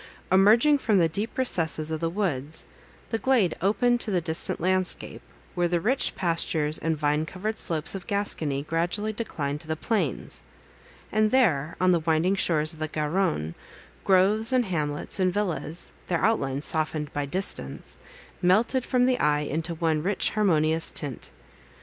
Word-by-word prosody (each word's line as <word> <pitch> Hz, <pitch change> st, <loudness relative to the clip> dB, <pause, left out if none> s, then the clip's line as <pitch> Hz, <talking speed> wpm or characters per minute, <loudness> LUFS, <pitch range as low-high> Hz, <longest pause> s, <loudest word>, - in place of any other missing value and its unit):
Emerging 225 Hz, +10 st, +5 dB
from 220 Hz, -6 st, +2 dB
the 170 Hz, -3 st, +4 dB
deep 205 Hz, +8 st, -4 dB
recesses 160 Hz, -10 st, +1 dB
of 160 Hz, -, -2 dB
the 165 Hz, 0 st, -1 dB
woods, 160 Hz, -6 st, -2 dB, 0.5 s
the 225 Hz, -, 0 dB
glade 230 Hz, -11 st, +2 dB
opened 240 Hz, +6 st, +2 dB
to -, -, -1 dB
the 185 Hz, -3 st, +2 dB
distant 160 Hz, -1 st, -1 dB
landscape, 185 Hz, +1 st, -1 dB, 0.3 s
where 175 Hz, -2 st, +1 dB
the 175 Hz, 0 st, 0 dB
rich 245 Hz, +9 st, +1 dB
pastures 165 Hz, -3 st, 0 dB
and 160 Hz, -1 st, -1 dB
vine 150 Hz, +1 st, +1 dB
covered 200 Hz, +7 st, -4 dB
slopes 160 Hz, -2 st, +1 dB
of 195 Hz, -2 st, -7 dB
Gascony 160 Hz, -9 st, 0 dB
gradually 175 Hz, +7 st, -1 dB
declined 150 Hz, -10 st, -4 dB
to 160 Hz, -, -11 dB
the 160 Hz, -, -1 dB
plains; 180 Hz, -, -2 dB, 0.7 s
and 215 Hz, 0 st, +3 dB
there, 170 Hz, -, +2 dB
on 185 Hz, 0 st, +4 dB
the 175 Hz, -, +3 dB
winding 160 Hz, +3 st, +1 dB
shores 155 Hz, -5 st, +1 dB
of 160 Hz, -, -14 dB
the 155 Hz, -, -2 dB
Garonne, 155 Hz, -, -1 dB, 0.5 s
groves, 205 Hz, +5 st, +3 dB
and 255 Hz, -2 st, +3 dB
hamlets, 150 Hz, -3 st, -3 dB
and 185 Hz, -1 st, +3 dB
villas—their 175 Hz, -2 st, -2 dB
outlines 140 Hz, -10 st, 0 dB
softened 155 Hz, -1 st, -1 dB
by 145 Hz, -1 st, -2 dB
distance, 190 Hz, +7 st, -2 dB, 0.4 s
melted 220 Hz, +8 st, +3 dB
from 250 Hz, 0 st, +2 dB
the 255 Hz, -1 st, +2 dB
eye 150 Hz, 0 st, +2 dB
into 160 Hz, +3 st, -3 dB
one 160 Hz, -2 st, 0 dB
rich 190 Hz, +4 st, 0 dB
harmonious 160 Hz, -6 st, +2 dB
tint. 140 Hz, -6 st, -6 dB
175 Hz, 155 wpm, -26 LUFS, 155-205 Hz, 0.7 s, Emerging